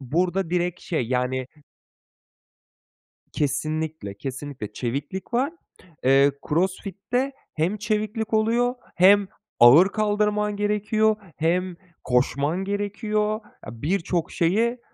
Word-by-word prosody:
burada 175 +6 0
direkt 180 0 -1
şey, 155 -9 -2
yani 125 +1 -1 1.9
Kesinlikle, 155 -4 -2
kesinlikle. 135 -4 -6
Çeviklik 140 - -4
var, 265 +6 +1 0.5
eee, 135 +2 +5 0.2
CrossFit'te 195 - -1 0.2
hem 170 +7 0
çeviklik 215 +1 -2
oluyor, 235 +3 +2 0.2
hem 195 +2 +6 0.3
ağır 145 +11 +8
kaldırman 210 0 0
gerekiyor, 210 +1 +1 0.2
hem 180 +3 0 0.3
koşman 140 +7 +1
gerekiyor. 210 +1 -1 0.3
A 115 0 -9
birçok 170 0 -1
şeyi, 225 +8 +1
185 Hz, 90 wpm, -24 LUFS, 145-210 Hz, 1.9 s, ağır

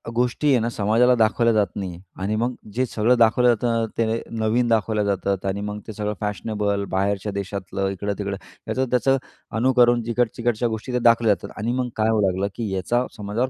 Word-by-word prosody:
गोष्टी 125 +5 +1
आहे 125 - +4
ना 115 - 0
समाजाला 115 +4 +3
दाखवल्या 115 +1 +3
जात 105 -2 +3
नाही 95 -2 -3
आहे 85 - -10 0.2
आणि 105 +2 0
मग 125 +2 0 0.2
जे 130 +2 +1
सगळं 120 +2 +2
दाखवलं 115 +2 +4
जातं 115 -1 +2
ते 115 0 0 0.2
नवीन 115 +3 +2
दाखवल्या 110 -2 +1
जातात 100 -1 -1
आणि 100 +1 -1
मग 105 0 -4
ते 110 - -6
सगळं 105 0 -2
फॅशनेबल, 105 -1 -1
बाहेरच्या 100 +2 -1
देशातलं, 100 0 -3
इकडं-तिकडं. 100 +1 -3 0.3
याचं-त्याचं 130 +2 +2 0.4
अनुकरण 120 -1 +4
जिकड-चिकडच्या 120 0 0
गोष्टी 110 +3 -5
त्या 125 - +1
दाखवल्या 115 -2 +5
जातात - - -11
आणि 115 +3 -1
मग 125 -1 -1
काय 110 +1 +2
होऊ 110 -2 +2
लागलं, 95 +2 0
की 115 -4 -3
याचा 120 +7 0
समाजावर 110 +5 -2
110 Hz, 180 wpm, -23 LUFS, 100-120 Hz, 0.4 s, दाखवल्या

